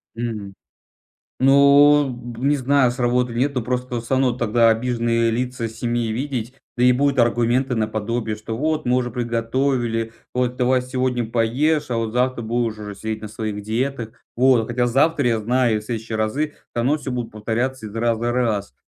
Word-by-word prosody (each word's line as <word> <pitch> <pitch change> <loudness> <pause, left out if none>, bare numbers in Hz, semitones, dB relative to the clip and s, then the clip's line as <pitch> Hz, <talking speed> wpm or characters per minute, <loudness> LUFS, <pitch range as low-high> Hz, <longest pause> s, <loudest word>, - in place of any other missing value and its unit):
Мгм. 110 -4 -5 0.9
Ну, 140 +2 +6 0.3
м, 125 +4 -1
не 145 - +3
знаю, 135 -1 +3
сработает 125 -1 0
или 120 - +2
нет, 140 0 -3
но 125 - 0
просто 125 +1 -3
всё 115 - -12
равно 130 -1 +2
тогда 120 -1 +3
обиженные 115 0 +1
лица 125 0 -2
семьи 115 0 -2
видеть, 125 0 -3 0.2
да - - +1
и 125 - +6
будут 140 +2 +1
аргументы 120 +2 +2
наподобие, 110 0 -2
что 110 +1 -6
вот 155 +3 -1
мы 125 +1 +3
уже 125 -1 -1
приготовили, 120 0 -1 0.2
вот 125 0 0
давай 125 +1 +2
сегодня 125 -2 -2
поешь, 130 +7 +1
а 120 - 0
вот 115 -1 -2
завтра 125 0 +1
будешь 115 -1 -1
уже 105 -1 -7
сидеть 110 +2 -5
на 110 - -6
своих 105 -1 -4
диетах. 115 +2 -2 0.2
Вот. 125 -2 +3
Хотя 120 0 0
завтра, 140 +3 +2
я 115 -2 +2
знаю, 120 0 +1
и - - -2
в - - -13
следующие 110 0 -4
разы 110 +8 0
всё - - -27 0.2
равно 125 +5 +1
всё 140 -3 -6
будет 125 -2 -3
повторяться 115 +3 -2
из 105 - -10
раза 115 +1 0
раз. 110 - -1
120 Hz, 180 wpm, -21 LUFS, 115-130 Hz, 0.9 s, Ну